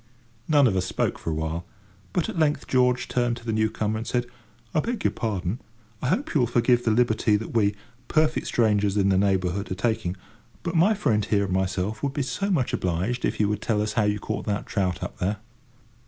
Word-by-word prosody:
None 145 -3 +5
of 110 -6 +3
us 95 0 0
spoke - - -1
for - - -4
a 80 - -1
while; 80 +2 -2 0.5
but, 175 - 0
at - - -4
length, 150 -2 +2
George 125 -1 +2
turned 120 -1 0
to 115 - -13
the 115 - -1
new 110 0 +2
comer, 110 0 -2
and 115 - -6
said: 120 -1 0 0.5
"I - - +3
beg 235 +6 -2
your - - +3
pardon, 105 -1 -2 0.4
I - - -1
hope 220 - 0
you 150 - +3
will 120 - +3
forgive 120 +1 +3
the - - +1
liberty 110 -1 +3
that 105 +2 -3
we—perfect 115 +8 0
strangers 105 -3 +2
in 100 -1 +3
the 95 - +3
neighbourhood—are 95 -1 0
taking, 95 -3 -1 0.5
but 170 - -2
my 185 +6 +4
friend 110 - +1
here 100 -2 +2
and 95 - -3
myself 95 +3 -1
would 140 -1 -1
be 145 -1 -1
so 195 +9 -2
much 155 -11 +1
obliged 95 +8 -1
if - - -2
you 105 - +3
would 105 0 -1
tell 110 -2 0
us 105 0 -1
how 110 -3 +2
you 105 0 +1
caught 110 +3 -4
that 105 -1 -1
trout 90 -3 -1
up - - -6
there." 100 +4 0
110 Hz, 220 wpm, -25 LUFS, 100-125 Hz, 0.5 s, None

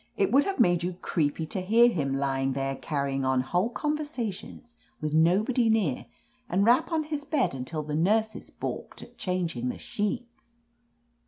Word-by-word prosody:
*Tt 395 -2 +2
would 280 +2 +5
have 390 0 -2
made 175 -1 +4
you 180 +1 -2
creepy 160 -3 -1
to 185 +4 -4
hear 225 +6 +5
him, 140 - 0
lying 135 -1 0
there 135 0 -2
carrying 140 -2 -2
on 130 -1 +2
whole 175 - 0
conversations 245 - -4 0.3
with 155 -1 -3
nobody 210 +9 +3
near, 205 - +1 0.4
and 195 +3 +2
rap. 245 +8 +4
:)n 320 -1 +1
his 300 -1 -4
bed 290 - 0
until 135 +4 -4
the 150 0 -5
nurses 215 +8 +1
balked - - -6
at - - -16
changing 170 -9 -2
the - - -3
sheets 235 +2 -5
185 Hz, 165 wpm, -27 LUFS, 145-240 Hz, 0.4 s, would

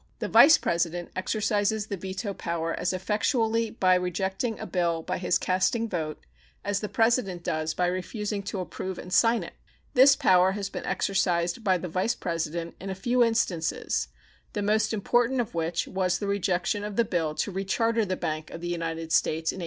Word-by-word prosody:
The - - -3
Vice 315 +2 +8
President 170 0 -1
exercises 210 +2 0
the 205 - -4
veto 190 +2 -5
power 165 -2 -3
as 180 - -1
effectually 220 +4 0
by 185 -5 +2
rejecting 190 +5 -1
a - - -5
bill 170 -3 0
by - - -3
his 175 -1 +2
casting 190 +7 +1
vote 160 -6 -3 0.5
as 205 -1 0
the 210 - -4
President 225 -6 +1
does 155 0 -2
by 180 - +1
refusing 200 +4 -3
to 195 -1 -3
approve 185 0 -5
and 180 - -7
sign 230 +4 +4
it. - - -9 0.4
This 270 +2 +7
power 185 -3 +4
has 200 -1 -4
been - - -6
exercised 180 0 0
by 190 -3 +3
the 180 - -5
Vice 185 +8 0
President 165 0 -3
in 195 - -5
a 190 - -3
few 240 +6 +2
instances, 210 - 0 0.5
the 205 - -2
most 215 +1 +2
important 240 +4 +1
of 235 -1 -2
which 165 0 -1
was 185 -2 0
the 205 - -4
rejection 200 0 0
of 210 -1 -5
the 235 - +3
bill 165 -6 -1
to 205 - -2
recharter 225 +4 0
the 185 - -1
Bank 155 -1 -3
of - - -8
the 175 - -4
United 165 -1 -3
States 160 +1 +2
in - - -9
1811. - - -6
190 Hz, 190 wpm, -27 LUFS, 175-215 Hz, 0.5 s, Vice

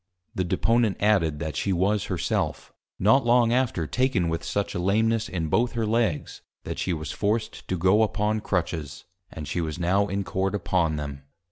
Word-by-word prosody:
The 95 - -1
Deponent 115 +4 +1
added, 95 -8 +2
that 80 -2 -4
she 100 - -1
was 95 +3 +1
Her - - -3
self, - - -2 0.2
not 110 +8 +4
long 120 -1 +4
after 120 -10 +1
taken 120 - +1
with 80 0 -2
such 100 -1 -2
a - - -2
Lameness, 110 +4 +1
in 85 -3 -2
both 115 +9 +1
her 115 -1 -1
Legs, 110 -7 -1 0.2
that - - -5
she 95 - -1
was 80 -4 -3
forced 110 +2 -2
to 95 - -1
go 95 +5 +4
upon 110 0 +1
Crutches; 80 -7 -3 0.3
and 75 -2 -7
she 85 +3 -1
was 80 -2 -3
now 95 +4 +2
in 100 0 -2
Court 95 +1 -1
upon 85 -4 0
them. 70 -2 -5
95 Hz, 190 wpm, -25 LUFS, 85-110 Hz, 0.3 s, not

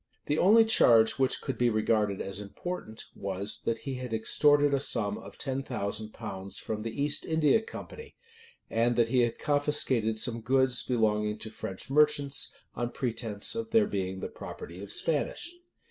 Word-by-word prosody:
[] - - -45
The 150 +1 0
only 225 +4 +6
charge 115 - +5
which 130 -1 +1
could 130 -5 -4
be 120 -1 +4
regarded 110 -2 +1
as 95 0 -4
important, 110 - -6
was, 100 +1 -2
that 115 - 0
he 135 +3 -6
had 125 -3 -4
extorted 145 +5 +4
a 140 - +3
sum 105 -6 -1
of - - -12
ten 135 -1 -2
thousand 110 -4 -4
pounds 100 -4 -4
from 110 -1 -4
the 115 +4 -5
East 145 +1 +1
India 160 +5 +3
company, 460 - -10 0.5
and 120 +1 +1
that 115 -1 +2
he 125 - +2
had 120 -1 +1
confiscated 145 -6 +1
some 115 +1 +1
goods 130 +1 +2
belonging 105 -3 0
to 110 0 -7
French 95 +3 -7
merchants, 145 -1 +2 0.2
on 120 0 -2
pretence 115 -5 -1
of 230 0 -4
their 225 -2 +4
being 95 - -3
the - - -3
property 85 +3 -9
of 100 0 -6
Spanish. 165 - -1
120 Hz, 175 wpm, -29 LUFS, 110-145 Hz, 0.5 s, only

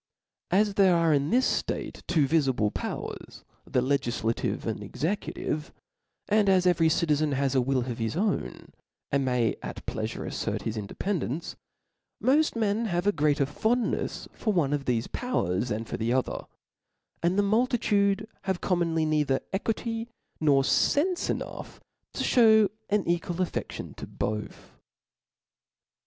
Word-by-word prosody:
As 205 +2 +3
there 195 -3 +5
are 165 -2 +3
in 140 0 +1
this 255 +3 +3
ftate - - -5
two 160 -6 +3
vifible 130 -9 +2
powers, - - -6 0.3
thi 125 - +2
legiflative 120 -4 -1
and - - -3
executive, 155 -3 -3 0.6
and 210 -1 +3
as 185 -1 +4
every 165 -3 +4
citizen 155 -2 +1
has 135 0 +1
a 130 - +3
will 130 +1 +1
of 120 -2 -5
his 115 -1 -2
own, 205 +1 -2 0.4
and 140 0 +2
may 125 -3 +1
at - - -7
pleafure - - -4
aftert - - -3
his 110 - -3
independence; 155 - -3 0.6
pioft 300 +3 +3
men 220 0 +1
have 175 -3 -1
a 205 - +5
greater 145 -5 +2
fondneis 220 - -1
for 215 - -1
one 155 -8 +1
of 140 -2 -2
thefe 120 -2 -1
powers 120 - -1
than 110 +1 -2
for - - -4
the 115 +1 -1
other, 130 0 -1 0.8
and 175 +3 +1
the 205 - +4
• - - 0
multitude 215 -2 +2 0.2
have 190 -2 0
commonly 170 -3 +1
neither 150 -3 +1
equity 225 +3 -2 0.3
nor 140 -3 +4
fcnfc 345 - +2
enough, - - -5 0.4
to - - -1
(hew 220 -4 +5 0.2
an 205 -1 +1
equal 175 0 0
afTedtion 180 0 -4
to - - -7
both. 105 0 -5
165 Hz, 145 wpm, -27 LUFS, 135-205 Hz, 0.8 s, there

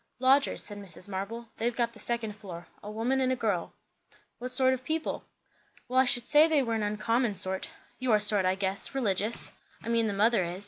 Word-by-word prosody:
"Lodgers," 265 +2 +3
said 205 -1 -4
Mrs. 185 -2 -3
Marble. 205 +4 -5
"They've 235 +1 0
got 235 -1 0
the - - -14
second 235 -3 -2
floor. 180 -5 -9 0.2
A 205 - -8
woman 235 +5 0
and 260 0 +2
a - - +2
girl." 205 -8 -1 0.7
"What 250 +1 -5
sort 260 0 +4
of 260 0 -4
people?" 315 +4 -2 0.6
"Well, 255 +1 +2
I 260 - +5
should 245 -1 +1
say 300 +1 +7
they 305 -4 +3
were 230 -2 -2
an 220 - 0
uncommon 215 +2 0
sort. 190 0 0 0.3
Your 240 -5 +3
sort, 210 -1 +2
I 185 0 +2
guess. 195 +6 -3
Religious. 215 -3 -1 0.3
I - - -5
mean 230 -1 +2
the 205 - -1
mother 215 0 +3
is. 175 +2 -5
225 Hz, 210 wpm, -29 LUFS, 200-255 Hz, 0.7 s, say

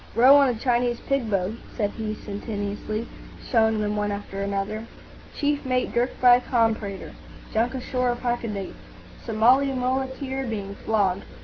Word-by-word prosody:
"Row 255 +5 +8
on 280 -2 +6
a 245 - 0
Chinese 240 0 +1
pig 275 -5 -1
boat," 195 0 0 0.2
said 205 -2 0
he, 215 -1 -4
sententiously, 210 +1 -4 0.4
showing 220 -3 +3
them 210 0 -1
one 205 0 -1
after 200 -1 -5
another.—"Chief 215 +8 -4
mate 255 -2 0
dirked 240 +2 0
by 245 -1 +7
a - - -5
comprador.—Junk 225 +1 -2
ashore 255 -1 -1
off 240 0 -2
Hakodate.—Somali 235 +3 0
muleteer 265 +1 -2
being 200 -3 -4
flogged. 200 -3 0
230 Hz, 130 wpm, -25 LUFS, 205-250 Hz, 0.4 s, Row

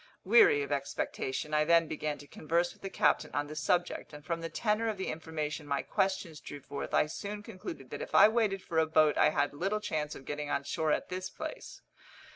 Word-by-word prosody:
Weary 190 -8 +6
of 140 - -6
expectation, 140 +1 -2
I 150 0 +4
then 165 +1 +4
began 155 -1 -3
to 145 - -13
converse 170 +5 0
with - - -24
the 195 - -4
captain - - +2
on 145 - +1
the 150 +1 -8
subject, 175 +1 0
and 150 0 -11
from 170 0 -2
the 165 - -4
tenor 215 +3 0
of 215 - -3
the 190 - -3
information 155 -1 -4
my 140 -1 0
questions 190 -5 -1
drew 145 - -8
forth 140 +1 -6
I - - +4
soon 205 +6 -6
concluded 180 - -8
that - - -5
if - - -5
I - - +9
waited 215 -4 +1
for 160 - 0
a 160 - +3
boat 155 -1 +4
I - - +5
had 145 0 0
little 195 +8 -1
chance 155 -7 -3
of 135 - -11
getting 145 0 -4
on 140 - 0
shore 155 +2 -1
at - - 0
this 185 0 -4
place. - - -8
160 Hz, 225 wpm, -31 LUFS, 150-185 Hz, -, I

